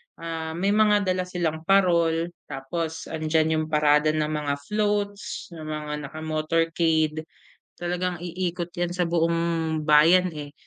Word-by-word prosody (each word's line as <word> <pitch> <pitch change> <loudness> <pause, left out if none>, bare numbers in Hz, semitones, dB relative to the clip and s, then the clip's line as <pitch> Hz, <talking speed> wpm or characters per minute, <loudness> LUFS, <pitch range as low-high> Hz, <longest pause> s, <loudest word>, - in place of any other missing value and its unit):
ah, 160 -1 -5
may 195 +4 +1
mga 210 -1 +4
dala 185 0 -2
silang 165 -3 -3
parol 170 -3 +3 0.2
tapos 160 +4 -4
andiyan 160 0 +1
yung 155 - -1
parada 150 0 +3
ng 155 0 0
mga 150 -2 -1
floats, 205 +1 -2
ng 160 -2 -8
mga 150 -1 -4
naka 155 +3 -9
motorcade. 160 0 0 0.5
Talagang 175 0 -2
iikot 175 0 -3
yan 175 0 -1
sa 180 -1 -1
buong 165 -1 0
bayan, 165 +5 +6
eh. 145 -1 -7
165 Hz, 135 wpm, -25 LUFS, 155-175 Hz, 0.5 s, bayan